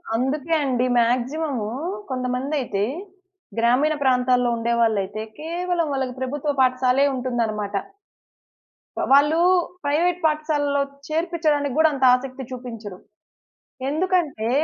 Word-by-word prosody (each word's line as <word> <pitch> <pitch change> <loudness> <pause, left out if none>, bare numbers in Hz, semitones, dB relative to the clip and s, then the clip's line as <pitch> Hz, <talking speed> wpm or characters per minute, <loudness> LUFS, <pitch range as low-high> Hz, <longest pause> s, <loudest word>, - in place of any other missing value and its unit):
అందుకే 280 +6 -1
అండి. 255 -2 +1
మాక్సిమం 255 +5 +1 0.5
కొంతమందయితే 255 -3 -2 0.8
గ్రామీణ 250 +7 +3
ప్రాంతాల్లో 250 -1 +3
ఉండేవాళ్ళైతే 220 -3 0 0.2
కేవలం 340 +1 -1
వాళ్ళకి 265 -2 -2
ప్రభుత్వ 290 +3 -2
పాఠశాలే 255 +1 +3
ఉంటుందన్నమాట. 230 -5 -2 1.4
వాళ్ళు 295 +3 +5 0.5
ప్రైవేట్ 335 +5 +1
పాఠశాలలో 300 -2 +1 0.3
చేర్పించడానికి 310 -4 0
గూడా 315 0 +5
అంత 270 -1 -3
ఆసక్తి 260 +1 -6
చూపించరు. 230 -6 -7 0.9
ఎందుకంటే 310 -8 0
265 Hz, 85 wpm, -23 LUFS, 245-305 Hz, 1.4 s, వాళ్ళు